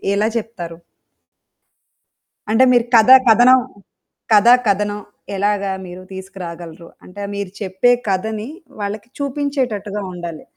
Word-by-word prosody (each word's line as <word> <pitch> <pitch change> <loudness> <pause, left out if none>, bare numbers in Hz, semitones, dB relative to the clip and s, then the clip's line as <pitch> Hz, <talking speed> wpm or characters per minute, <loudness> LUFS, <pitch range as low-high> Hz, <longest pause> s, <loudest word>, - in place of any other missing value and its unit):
ఎలా 210 +2 +1
చెప్తారు? 185 -7 -6 1.7
అంటే 225 +4 +4
మీరు 240 -2 +3
కథా, 230 +3 +8
కథనం 245 +3 +6 0.8
కథా, 215 +3 +6 0.2
కథనం 205 +1 0 0.4
ఎలాగా 200 0 0
మీరు 180 0 -10
తీసుకురాగలరు? 175 -3 -9 0.2
అంటే 190 +3 -10
మీరు 200 -2 -5
చెప్పే 190 +5 +2 0.2
కథని 215 +3 -2 0.3
వాళ్ళకి 205 +2 -5
చూపించేటట్టుగా 260 -8 -3
ఉండాలి. 170 -3 -7
205 Hz, 100 wpm, -18 LUFS, 190-225 Hz, 1.7 s, కథా